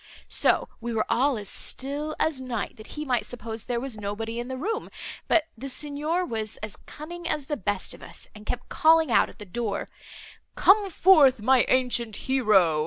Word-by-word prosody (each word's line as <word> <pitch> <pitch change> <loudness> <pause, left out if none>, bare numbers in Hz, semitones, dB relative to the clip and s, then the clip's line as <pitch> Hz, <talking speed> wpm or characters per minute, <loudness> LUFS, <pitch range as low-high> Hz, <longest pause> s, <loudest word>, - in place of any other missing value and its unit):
So - - +3
we 235 0 -4
were 215 - +1
all 255 +3 +2
as 205 -1 -4
still 290 +8 -1
as 300 -5 +1
night, 240 -5 -4
that 215 - -12
he 300 - -3
might 250 -3 +1
suppose 225 -2 -6
there 240 -1 -1
was 245 -4 -5
nobody 225 +3 -4
in 240 - -4
the 260 0 -4
room; 420 +11 -3 0.4
but 320 -2 +4
the 270 +4 -6
Signor 300 +6 -1
was 220 -6 -3
as 215 -2 -4
cunning 340 +3 -9
as 295 -3 -1
the 295 - -2
best 205 -4 -2
of - - -13
us, - - -8
and 210 0 -13
kept 245 - -3
calling 320 -3 +4
out - - +4
at - - -15
the 210 - -9
door, 205 +1 -3 0.7
'Come 400 0 +5
forth, 310 -9 +6
my 255 +3 +4
ancient 245 -4 +1
hero! 210 -13 +3
250 Hz, 190 wpm, -26 LUFS, 220-295 Hz, 0.7 s, forth